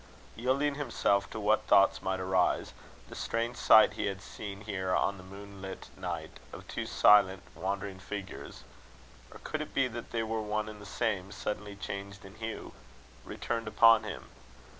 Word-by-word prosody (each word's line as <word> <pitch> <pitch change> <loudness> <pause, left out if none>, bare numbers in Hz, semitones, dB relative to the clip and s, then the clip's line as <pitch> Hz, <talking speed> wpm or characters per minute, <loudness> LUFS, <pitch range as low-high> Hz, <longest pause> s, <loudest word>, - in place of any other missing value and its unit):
Yielding 135 +5 +1
himself 115 -8 +1
to - - -6
what 110 +1 +2
thoughts 100 - +5
might 95 0 -1
arise, 95 -1 +1 0.3
the - - -11
strange 115 +1 -2
sight 110 -2 +7
he 105 - -2
had 95 -1 -3
seen 100 0 -8
here 95 -3 -1
on 100 - +1
that 95 - -11
moonlit 100 0 -9
night, - - -5
of - - -10
two - - -4
silent 95 -2 +5
wandering 100 -1 -3
figures 100 0 -7 0.7
or - - -10
could 155 - -3
it 155 - -7
be 135 -1 +3
that 120 -1 -7
they 115 -1 -1
were 110 0 -2
one 105 0 -2
and 105 -1 -9
the 100 - -10
same, 100 -4 -1
suddenly 105 0 -4
changed 100 0 -6
in 95 - -11
hue? 110 +1 -6 0.5
returned 115 -2 -3
upon 115 +1 +6
him. 110 - -6
105 Hz, 165 wpm, -31 LUFS, 100-115 Hz, 0.7 s, sight